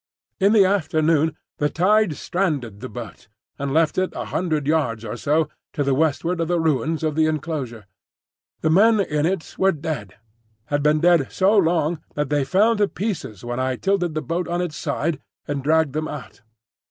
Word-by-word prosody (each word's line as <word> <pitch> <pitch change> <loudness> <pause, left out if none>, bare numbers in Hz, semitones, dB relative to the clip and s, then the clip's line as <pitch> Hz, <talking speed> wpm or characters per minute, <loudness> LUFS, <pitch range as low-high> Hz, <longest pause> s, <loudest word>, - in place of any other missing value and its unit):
In 200 +2 +4
the 205 -3 +6
afternoon 160 -4 +1 0.2
the 145 - +2
tide 195 0 +2
stranded 145 - -2
the 130 +3 -7
boat, 120 -4 -9 0.3
and 140 0 -2
left 160 +3 +2
it 185 - 0
a - - -4
hundred 155 -5 -1
yards 130 -8 0
or 105 - -4
so 150 +5 +1 0.3
to 145 - 0
the 140 -1 +1
westward 160 +4 0
of 165 - 0
the 175 0 +1
ruins 160 +1 0
of 155 -1 0
the 155 +1 +2
enclosure. 145 -8 -3 0.8
The 160 - +2
men 215 +5 +5
in 150 -5 +1
it 185 -2 -3
were 190 0 +4
dead, 150 - -5 0.5
had 145 +3 -1
been 150 +1 +3
dead 170 -6 +3
so 195 +3 +3
long 165 -4 +2
that 150 -1 -2
they 145 -1 +2
fell 200 +11 +3
to 205 -1 +3
pieces 180 - -4
when 120 +1 -3
I 130 0 0
tilted 175 +1 0
the 155 - -2
boat 170 +1 -2
on 175 +1 -1
its 175 -4 -3
side 155 0 -2 0.3
and 145 -1 -2
dragged 155 0 +2
them 155 +1 -2
out. 135 -3 -8
155 Hz, 190 wpm, -22 LUFS, 145-175 Hz, 0.8 s, the